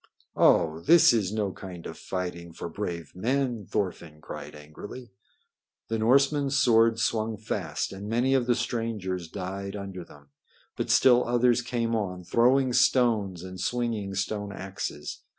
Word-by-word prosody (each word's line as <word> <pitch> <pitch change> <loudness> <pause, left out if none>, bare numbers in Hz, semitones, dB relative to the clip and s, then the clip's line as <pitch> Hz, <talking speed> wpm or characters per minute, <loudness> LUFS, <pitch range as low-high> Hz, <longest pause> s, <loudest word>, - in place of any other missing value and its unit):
"Oh, 80 0 +4
this 165 - +6
is 105 -5 0
no 105 -2 -1
kind 90 -3 -9
of - - -6
fighting 90 -2 -5
for 85 - -6
brave 85 -4 -5
men!" 120 0 -1
Thorfinn 85 -6 -3
cried 75 - -9
angrily. 80 +11 -10 0.8
The 115 0 -1
Norsemen's 140 +4 +3
swords 115 -3 +4
swung 110 -1 -1
fast, 110 -2 -3
and 100 +2 -7
many 120 +4 +2
of 130 -3 +2
the 120 - +3
strangers 110 -7 -3
died 95 +3 -5
under 95 -3 -6
them, 75 -3 -17 0.5
but - - -3
still 125 -1 +5
others 120 0 +2
came 120 -1 -2
on, 90 -4 -3
throwing 125 +7 +3
stones 105 -9 +2
and 95 0 -8
swinging 110 -3 -2
stone 100 +1 -2
axes. 95 -1 -6
105 Hz, 145 wpm, -27 LUFS, 95-120 Hz, 0.8 s, this